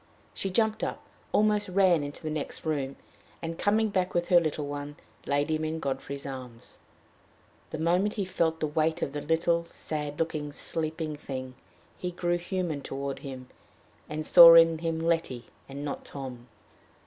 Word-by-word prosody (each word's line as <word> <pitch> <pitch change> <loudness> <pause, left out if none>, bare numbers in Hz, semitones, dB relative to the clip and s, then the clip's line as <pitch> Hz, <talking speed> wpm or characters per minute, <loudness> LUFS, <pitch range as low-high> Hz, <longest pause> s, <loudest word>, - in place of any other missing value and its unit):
She 195 - -3
jumped 220 +3 +1
up, - - -3 0.3
almost 210 -1 +2
ran 185 -3 +4
into 145 +2 -7
the 155 - -3
next 155 +1 -5
room, 140 -3 -1 0.4
and, 165 0 -4
coming 215 +2 +2
back 185 -2 -1
with 175 0 0
her 175 - +7
little 155 -2 -2
one, 145 0 -5 0.3
laid 145 +2 +1
him 155 0 0
in 160 +1 -2
Godfrey's 140 -1 -4
arms. 125 -4 -9 0.9
The - - -5
moment 180 +6 +1
he 200 - -1
felt 165 -3 0
the - - +2
weight 155 +1 0
of - - -2
the 145 - -3
little, 170 +2 +1
sad 150 -3 -4
looking, 155 -3 -2
sleeping 155 0 -3
thing, 130 -3 -6 0.5
he 180 - -2
grew 175 0 -1
human 175 -4 -2
toward 140 0 -4
him, 130 -2 -8 0.6
and 155 +1 -4
saw 170 0 +10
in 165 -1 +6
him 165 -1 -2
Letty 165 -7 0 0.2
and 140 +2 -6
not 145 - -4
Tom. 125 -3 -8
160 Hz, 165 wpm, -28 LUFS, 145-175 Hz, 0.9 s, saw